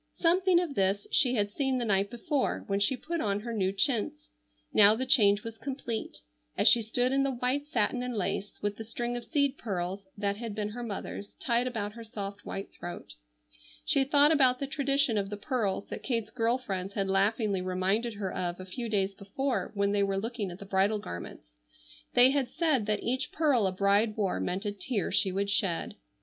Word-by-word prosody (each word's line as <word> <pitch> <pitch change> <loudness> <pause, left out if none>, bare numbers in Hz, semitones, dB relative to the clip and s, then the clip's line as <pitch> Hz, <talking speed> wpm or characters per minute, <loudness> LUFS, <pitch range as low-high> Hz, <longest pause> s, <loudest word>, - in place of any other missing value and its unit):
Something 360 +1 +3
of 345 -5 -2
this 195 -2 +1
she 255 -4 +3
had 205 -2 0
seen 265 +2 0
the 240 - -1
night 200 -1 +2
before 260 +4 -1
when 200 -2 -1
she 250 +6 +2
put 335 +5 -3
on 205 -1 0
her 235 +1 -5
new 190 -3 +1
chintz; 270 +9 -1 0.4
now 210 0 +8
the 260 +3 -2
change 205 -5 +5
was 225 -1 -8
complete, 260 -5 -4 0.4
as - - +3
she 235 - +7
stood 245 +3 0
in 275 0 +2
the 275 - +1
white 255 +4 -1
satin 245 -2 0
and 250 -1 -3
lace 200 0 -3
with 205 0 -1
the 225 - -6
string 240 +2 -4
of 240 - -4
seed 280 -2 0
pearls 190 -1 -4
that 200 0 -1
had 225 -2 -5
been 210 -1 -2
her 240 +3 -7
mother's 205 -2 -6
tied 240 0 0
about 215 -4 -3
her 230 0 -9
soft 205 -2 -7
white 195 - -5
throat. 175 - -8 0.7
She 275 - +3
thought 290 +2 +6
about 260 -5 +4
the 275 - -3
tradition 275 -4 +1
of 195 -1 -3
the 205 - -5
pearls 205 -4 -2
that - - -6
Kate's 230 -5 -2
girl 235 0 +1
friends 195 -6 -5
had 195 -2 -1
laughingly 195 +1 +1
reminded 190 +5 0
her 195 -2 -4
of 175 0 -3
a 185 - -7
few 230 +5 -5
days 195 -2 +1
before 245 +7 -2
when 200 0 +1
they 205 0 +2
were 195 -1 +1
looking 220 -1 -3
at 175 - -8
the 200 - -10
bridal 195 +2 +2
garments. 85 - -8 0.6
They 250 +2 +7
had 275 -3 0
said 285 -11 +1
that 210 0 0
each 260 +3 -1
pearl 280 -10 +2
a - - 0
bride 200 +3 +2
wore 195 - 0
meant 185 - -2
a 205 - 0
tear 205 +2 -2
she 195 -1 +3
would 200 +2 -1
shed. 195 -4 0
215 Hz, 210 wpm, -29 LUFS, 200-255 Hz, 0.7 s, now